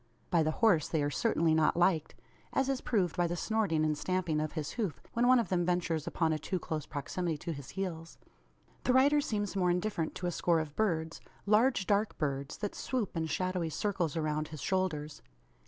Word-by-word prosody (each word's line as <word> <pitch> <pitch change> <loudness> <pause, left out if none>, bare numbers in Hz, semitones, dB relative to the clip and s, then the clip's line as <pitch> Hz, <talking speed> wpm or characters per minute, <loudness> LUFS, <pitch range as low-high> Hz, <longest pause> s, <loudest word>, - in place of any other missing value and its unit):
By 170 - +4
the 155 - +2
horse 170 -3 +3
they 155 -3 0
are 145 - 0
certainly 165 - +2
not 160 +1 +3
liked; 175 -3 +2 0.4
as 270 0 +1
is 270 -2 0
proved 190 -8 0
by 175 -1 +2
the 175 - -2
snorting 195 -7 +1
and 155 -1 +1
stamping 175 -1 -1
of 155 - -3
his 155 -3 -3
hoof, 210 -10 -3
when 240 +1 +2
one 255 0 +7
of 235 - 0
them 180 -2 +1
ventures 175 -3 0
upon 160 -2 +1
a 155 - -2
too 185 - -2
close 155 -3 -4
proximity 160 +3 -3
to 165 +3 -4
his 140 -3 -9
heels. 165 -4 -4 0.7
The 250 - +2
rider 285 +3 +5
seems 205 -8 -2
more 180 -2 +2
indifferent 175 -2 -1
to 180 - -5
a 175 - 0
score 170 0 +2
of 155 -2 -5
birds 165 -7 -1 0.2
large 215 +1 +3
dark 205 +2 +1
birds 140 -2 -2
that 205 -1 -3
swoop 245 -8 -3
in 160 -1 -1
shadowy 180 +1 -1
circles 175 -3 -1
around 155 -1 -1
his 155 -2 -8
shoulders. 160 -6 -1
175 Hz, 205 wpm, -32 LUFS, 155-205 Hz, 0.7 s, one